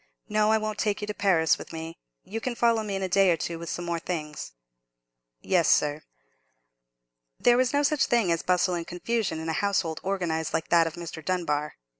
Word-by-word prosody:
No, 215 Hz, 0 st, +2 dB
I 220 Hz, -, +4 dB
won't 215 Hz, -1 st, -3 dB
take 210 Hz, -1 st, 0 dB
you -, -, -2 dB
to 210 Hz, -, -4 dB
Paris 180 Hz, -6 st, +2 dB
with -, -, -9 dB
me. 165 Hz, 0 st, -7 dB, 0.2 s
You 225 Hz, +3 st, -5 dB
can 250 Hz, 0 st, -3 dB
follow 230 Hz, -1 st, +3 dB
me 205 Hz, -2 st, -3 dB
in 195 Hz, -, -2 dB
a -, -, 0 dB
day 195 Hz, +1 st, +4 dB
or 170 Hz, -, +3 dB
two 165 Hz, +2 st, -4 dB
with 170 Hz, -, -6 dB
some 175 Hz, -, -4 dB
more 170 Hz, -1 st, -2 dB
things." 150 Hz, -, -5 dB, 0.9 s
"Yes, 175 Hz, -4 st, +2 dB
sir." 150 Hz, +1 st, +2 dB, 1.4 s
There 240 Hz, -, +5 dB
was 255 Hz, 0 st, +2 dB
no 285 Hz, 0 st, +2 dB
such 290 Hz, -1 st, +2 dB
thing 230 Hz, -7 st, +2 dB
as 165 Hz, -, +1 dB
bustle 180 Hz, 0 st, +1 dB
and 170 Hz, -1 st, -3 dB
confusion 180 Hz, -1 st, -2 dB
in 160 Hz, -, -5 dB
a 160 Hz, -, 0 dB
household 180 Hz, -4 st, 0 dB
organized 165 Hz, -5 st, -2 dB
like 160 Hz, -, -2 dB
that 170 Hz, -1 st, +5 dB
of 160 Hz, -, -6 dB
Mr. 170 Hz, -2 st, -7 dB
Dunbar. 150 Hz, -4 st, -1 dB
180 Hz, 210 wpm, -27 LUFS, 165-210 Hz, 1.4 s, There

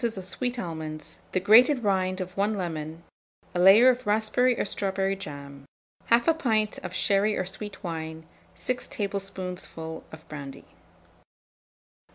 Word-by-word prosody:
of 220 Hz, -6 st, -2 dB
sweet 245 Hz, +6 st, -3 dB
almonds, 160 Hz, -6 st, -6 dB
the 185 Hz, -, +1 dB
grated 245 Hz, +7 st, +6 dB
rind 185 Hz, -2 st, +1 dB
of 185 Hz, 0 st, -5 dB
1 205 Hz, +2 st, +1 dB
lemon, 165 Hz, -3 st, -4 dB, 0.5 s
a 175 Hz, -, -1 dB
layer 195 Hz, +7 st, +8 dB
of 255 Hz, -3 st, +3 dB
raspberry 220 Hz, +4 st, +2 dB
or -, -, +1 dB
strawberry 195 Hz, -1 st, -1 dB
jam, 140 Hz, -6 st, -9 dB, 0.5 s
1/2 240 Hz, +8 st, +4 dB
pint 220 Hz, -7 st, +1 dB
of -, -, -7 dB
sherry 205 Hz, +1 st, +2 dB
or 185 Hz, -, -1 dB
sweet 200 Hz, +2 st, -6 dB
wine, 160 Hz, -2 st, -5 dB, 0.3 s
6 255 Hz, 0 st, -3 dB
tablespoonfuls 185 Hz, -5 st, -5 dB
of 160 Hz, 0 st, -12 dB
brandy. 140 Hz, -3 st, -8 dB
195 Hz, 135 wpm, -27 LUFS, 165-215 Hz, 0.5 s, layer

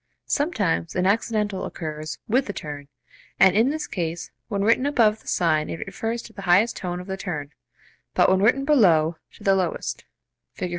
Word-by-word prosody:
Sometimes 205 Hz, -, 0 dB
an 180 Hz, -, +1 dB
accidental 210 Hz, -1 st, 0 dB
occurs 155 Hz, -2 st, -5 dB
with 255 Hz, +5 st, +1 dB
the 205 Hz, -, -4 dB
turn, 145 Hz, -4 st, -7 dB, 0.5 s
and 190 Hz, -1 st, +6 dB
in 225 Hz, +5 st, +4 dB
this 305 Hz, +1 st, -2 dB
case 170 Hz, -2 st, -4 dB, 0.2 s
when 200 Hz, -3 st, -1 dB
written 230 Hz, +5 st, +3 dB
above 220 Hz, -6 st, +3 dB
the -, -, -22 dB
sign 155 Hz, -3 st, +1 dB
it 220 Hz, -, -5 dB
refers 225 Hz, +4 st, -4 dB
to 225 Hz, -, -13 dB
the 200 Hz, -, -9 dB
highest 195 Hz, +5 st, +3 dB
tone 180 Hz, -1 st, -4 dB
of 180 Hz, -, -8 dB
the 190 Hz, 0 st, -4 dB
turn, 155 Hz, -7 st, -5 dB, 0.6 s
but -, -, +5 dB
when 190 Hz, 0 st, +3 dB
written 255 Hz, +6 st, +3 dB
below, 170 Hz, -, +4 dB, 0.2 s
to -, -, -16 dB
the 195 Hz, -, +4 dB
lowest 185 Hz, -3 st, -2 dB, 0.5 s
(Fig. 180 Hz, -, -4 dB
195 Hz, 185 wpm, -24 LUFS, 170-225 Hz, 0.6 s, and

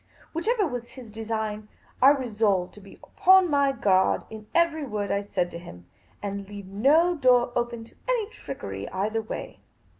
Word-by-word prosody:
Whichever 420 Hz, +6 st, +1 dB
was 245 Hz, -6 st, -5 dB
his 245 Hz, -5 st, -12 dB
design, 220 Hz, -1 st, -4 dB, 0.3 s
I 265 Hz, -, +9 dB
resolved 220 Hz, -9 st, +1 dB
to 210 Hz, -, -14 dB
be 195 Hz, -, -14 dB
upon 375 Hz, -2 st, +4 dB
my 280 Hz, -1 st, +3 dB
guard 190 Hz, -7 st, +2 dB
in 215 Hz, -1 st, -9 dB
every 335 Hz, -2 st, +2 dB
word 210 Hz, -6 st, -3 dB
I 200 Hz, -, +1 dB
said 185 Hz, -3 st, -2 dB
to 170 Hz, -, -7 dB
him, 90 Hz, -, -12 dB, 0.4 s
and 200 Hz, -1 st, -5 dB
leave 205 Hz, -1 st, -8 dB
no 280 Hz, -, +3 dB
door 250 Hz, -4 st, +4 dB
open 240 Hz, -1 st, -2 dB
to 225 Hz, -, -17 dB, 0.2 s
any 470 Hz, -4 st, +1 dB
trickery 95 Hz, -, -7 dB
either 215 Hz, +4 st, -1 dB
way. 220 Hz, -, -7 dB
225 Hz, 170 wpm, -26 LUFS, 200-280 Hz, 0.4 s, I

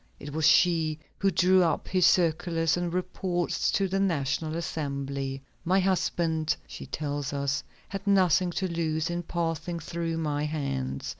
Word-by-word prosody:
It 145 Hz, 0 st, -8 dB
was 160 Hz, 0 st, +3 dB
she 160 Hz, -2 st, +4 dB, 0.2 s
who 195 Hz, -, +3 dB
drew 185 Hz, +1 st, +4 dB
up 165 Hz, -3 st, +1 dB
his 185 Hz, -2 st, +4 dB
circulars 165 Hz, -1 st, +2 dB
and 175 Hz, -1 st, -2 dB
reports 180 Hz, 0 st, -1 dB
to 195 Hz, -, +2 dB
the 195 Hz, +1 st, -1 dB
National 160 Hz, -3 st, 0 dB
Assembly. 140 Hz, -4 st, -3 dB, 0.2 s
"My 185 Hz, +2 st, +3 dB
husband," 170 Hz, -4 st, +1 dB
she -, -, -9 dB
tells 145 Hz, -1 st, -3 dB
us, 140 Hz, 0 st, -1 dB, 0.2 s
"had 195 Hz, +1 st, -6 dB
nothing 185 Hz, -2 st, +4 dB
to 190 Hz, -, -1 dB
lose 165 Hz, -1 st, -1 dB
in 175 Hz, 0 st, -2 dB
passing 170 Hz, 0 st, -2 dB
through 165 Hz, +1 st, -3 dB
my 150 Hz, -2 st, -1 dB
hands. 70 Hz, -, -3 dB
165 Hz, 150 wpm, -28 LUFS, 150-180 Hz, 0.2 s, she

